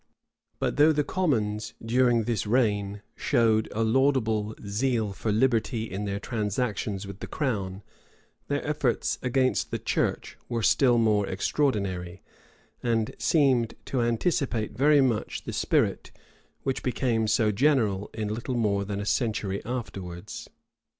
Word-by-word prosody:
But - - -1
though 150 +2 +6
the 150 -1 +1
commons, 110 - -1
during 120 0 +2
this 110 -1 -1
reign, 105 -4 +1
showed 115 -4 +2
a 115 - 0
laudable 110 -3 +1
zeal 110 0 0
for 105 +3 -2
liberty 115 0 +1
in 105 -2 -4
their 100 0 -2
transactions 105 -3 -2
with 100 0 -9
the - - -6
crown, 100 -9 -2 0.6
their 145 0 -1
efforts 145 -5 0
against 130 0 +1
the - - -2
church - - -1
were 115 -2 -1
still 125 0 +4
more 105 -3 +2
extraordinary, 95 -5 -1 0.6
and 115 -2 0
seemed 130 -7 +2
to 130 - -1
anticipate 120 -1 0
very 145 +4 +5
much 120 -5 -1
the - - -6
spirit - - +1 0.5
which 135 - -1
became 120 -3 0
so 110 0 +3
general 105 -5 +2
in 110 -1 -3
little 115 +4 -3
more 100 -3 +1
than 100 0 -4
a 105 - -3
century 105 -4 -1
afterwards. 95 -8 -6
115 Hz, 135 wpm, -27 LUFS, 105-130 Hz, 0.6 s, though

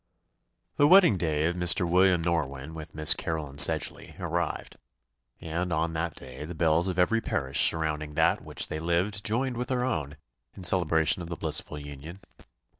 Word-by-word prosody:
The 145 - +4
wedding 180 - +6
day 80 -3 -1
of 85 +1 -1
Mr. 90 0 +1
William 90 0 +2
Norwynne 75 -3 -3
with 80 -1 -10
Miss 75 -1 +5
Caroline 75 -4 -5
Sedgeley - - +4
arrived; - - -4 0.6
and, 85 +2 -4
on 80 +1 -1
that 80 +1 -4
day, 65 +2 -10
the 85 +3 -8
bells 80 +2 +1
of 95 -1 -3
every 115 +6 +1
parish 70 -7 +3
surrounding 75 -2 -4
that 80 0 +2
in - - -18
which - - +1
they 80 - -5
lived 90 +5 -1
joined 125 +3 -2
with 125 0 -4
their 125 -1 -1
own, 75 - -4 0.4
in 95 - -11
celebration 85 -2 +1
of 85 - -8
the 85 - -6
blissful 75 -2 -2
union. 75 +5 -10
85 Hz, 175 wpm, -26 LUFS, 75-90 Hz, 0.6 s, wedding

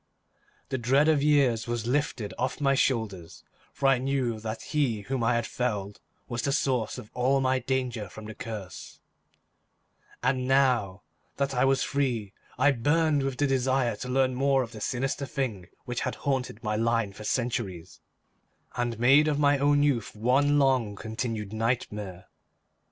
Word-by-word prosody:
The 130 - -2
dread 135 +6 +3
of 155 -3 +3
years 140 -7 +3
was 120 -2 -2
lifted 125 -5 -1
off 130 +3 -1
my 135 -2 +3
shoulders, 105 -11 -1 0.3
for - - -4
I 135 -2 +5
knew 130 -4 -1
that 110 +1 -5
he 135 -8 0
whom 125 +4 -3
I 120 +1 +2
had 120 -1 0
felled 105 -6 -3 0.3
was 120 -1 -3
the 140 - 0
source 130 -5 0
of 110 - -10
all 130 +2 +2
my 130 0 +2
danger 125 -5 -2
from 110 +3 -10
the 110 - -7
curse; 105 -5 -8 1.2
and 130 0 +1
now 125 -8 +2 0.3
that 140 0 0
I 125 +1 +2
was 135 0 +2
free, 120 -8 -1 0.2
I 145 +4 +4
burned 145 +4 +2
with 135 -1 -2
the 145 - +2
desire 130 -3 +1
to 125 - -6
learn 130 0 +2
more 135 +1 +2
of 115 - -8
the 110 - -10
sinister 135 +4 -2
thing 115 -10 -3 0.2
which 125 -1 -3
had - - -2
haunted 130 -5 -1
my 105 -1 -1
line 115 -2 0
for 105 - -10
centuries, 105 -8 -3 0.7
and 120 -2 -1
made 135 +6 +5
of 150 -2 +1
my 145 -1 +3
own 145 +1 +3
youth 135 -7 0
one 135 +6 +3
long 130 -7 +2
continued 110 -1 -4
nightmare. 105 -5 -2
125 Hz, 165 wpm, -27 LUFS, 110-135 Hz, 1.2 s, I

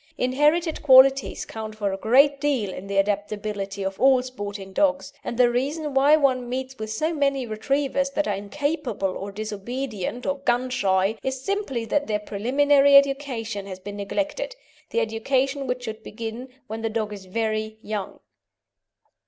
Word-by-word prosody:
Inherited 300 +6 +2
qualities 270 -1 +5
count 220 -1 -7
for 205 -2 -1
a - - -3
great 275 +7 +4
deal 255 -10 0
in 190 - -8
the 200 0 -2
adaptability 205 0 -1
of 190 0 -4
all 260 -1 +5
sporting 205 -6 -7
dogs, 285 +2 +1
and 235 - -4
the 245 -1 +5
reason 285 +4 -2
why 280 +3 +6
one 260 -5 +1
meets 260 0 -4
with 220 0 -4
so 310 +10 -1
many 275 -3 +1
Retrievers 275 +5 0
that 300 - +1
are 205 - +1
incapable 250 - -2
or 200 +1 -5
disobedient 215 +2 -4
or 280 0 -1
gun 250 -1 0
shy 195 -2 +1
is 265 0 -3
simply 390 - -2
that 290 +5 0
their 210 -1 +1
preliminary 275 +7 +3
education 265 -7 +2
has 185 -1 -7
been 205 +2 -8
neglected 300 - -3 0.3
the 230 - 0
education 260 +5 0
which 250 0 -2
should 220 -2 -6
begin 230 +4 -7 0.2
when 220 +1 -6
the 225 - -1
dog 215 -1 -2
is 195 -2 -9
very 215 +2 -2
young. 210 -2 -5
245 Hz, 160 wpm, -24 LUFS, 210-275 Hz, 0.3 s, why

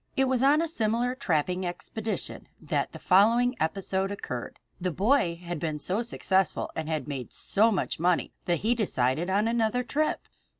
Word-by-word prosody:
It 265 0 +3
was 255 -2 +1
on 290 +4 +5
a - - -1
similar 240 -3 0
trapping 180 - 0
expedition 210 +5 -4
that - - -2
the - - -9
following 230 +6 +4
episode 190 +3 -1
occurred. 125 -11 -6 0.2
The 180 - -1
boy 190 - +2
had 175 -2 -4
been 155 -1 -2
so 185 +8 -1
successful 190 -6 0
and 160 -1 -3
had 155 -4 -2
made 135 -5 -5
so 220 +3 +2
much 190 - -1
money 175 +1 +1
that 175 -2 0
he 225 +3 +2
decided 165 - 0
on 205 +3 +2
another 235 +1 +1
trip. 305 +5 0
195 Hz, 170 wpm, -28 LUFS, 170-235 Hz, 0.2 s, on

